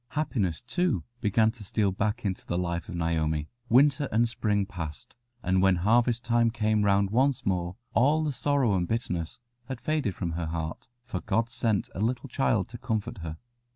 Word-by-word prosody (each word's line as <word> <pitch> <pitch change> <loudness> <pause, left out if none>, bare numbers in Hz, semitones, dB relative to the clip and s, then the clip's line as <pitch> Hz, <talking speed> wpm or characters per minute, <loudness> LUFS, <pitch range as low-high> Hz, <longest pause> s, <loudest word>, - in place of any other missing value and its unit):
Happiness, 100 - 0
too, 145 - 0 0.2
began 110 +1 +3
to 115 -2 -11
steal 100 0 +1
back 105 +4 -1
into 95 -2 -2
the 85 - -2
life 85 -1 -2
of - - -5
Naomi. 80 -2 0 0.2
Winter 140 +3 +4
and 115 +2 +3
spring 105 -3 0
passed, 80 -7 -7 0.3
and 95 +1 +2
when 95 -1 +5
harvest 115 +6 +2
time 115 0 +3
came 110 -2 +1
round 100 -1 +3
once 130 +3 +2
more, 90 -2 -1 0.2
all 150 +6 +4
the 150 - 0
sorrow 135 -5 +2
and 90 -2 +1
bitterness 90 -8 -2 0.4
faded 150 - -1
from 85 -3 -3
her 80 0 -3
heart, 80 0 -4 0.2
for 95 -6 -4
God 115 +3 0
sent 115 -3 0
a - - -6
little 125 +4 -1
child 110 -7 +1
to 120 0 -9
comfort 110 0 -2
her. 80 -2 -6
105 Hz, 180 wpm, -28 LUFS, 90-120 Hz, 0.4 s, when